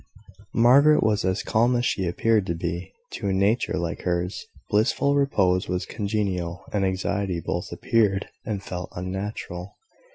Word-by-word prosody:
Margaret 140 +6 +6
was 110 -1 +2
as 95 0 0
calm 120 +3 +2
as 120 0 +1
she 95 - 0
appeared 105 +3 +2
to 85 - -1
be. 85 +2 -4 0.2
To 100 - -4
a 95 - +1
nature 100 +2 +1
like 85 -3 -3
hers, 90 +1 -2 0.2
blissful 115 +6 +2
repose 95 -10 +2
was 90 0 -1
congenial, 95 -5 -2
and 100 -2 +1
anxiety 95 -1 -1
both - - -3
appeared 100 -4 +1 0.2
and 100 -3 -4
felt 90 -2 -5
unnatural. 90 0 -5
95 Hz, 150 wpm, -25 LUFS, 90-110 Hz, 0.2 s, Margaret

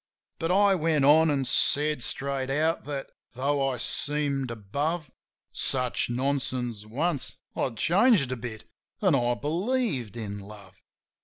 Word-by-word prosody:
But 165 - -1
I 200 +1 +5
went 160 -5 +2
on, 160 +3 +6
an' 140 -2 +1
said 150 +1 +2
straight 135 +2 -3
out 155 +3 0
that, 140 -2 -5 0.2
tho' 135 +1 +1
I 130 - -3
seemed 140 +1 -1
above 140 - -3 0.4
Such 125 -3 0
nonsense 125 -4 -2
once, 145 +5 -1 0.2
I'd 120 -4 -2
changed 180 - +3
a - - -1
bit, 115 -2 -7 0.4
an' 190 -5 +3
I 120 -2 +2
believed 155 - -1
in 105 -3 -5
love. 100 -2 -13
140 Hz, 135 wpm, -27 LUFS, 120-155 Hz, 0.4 s, on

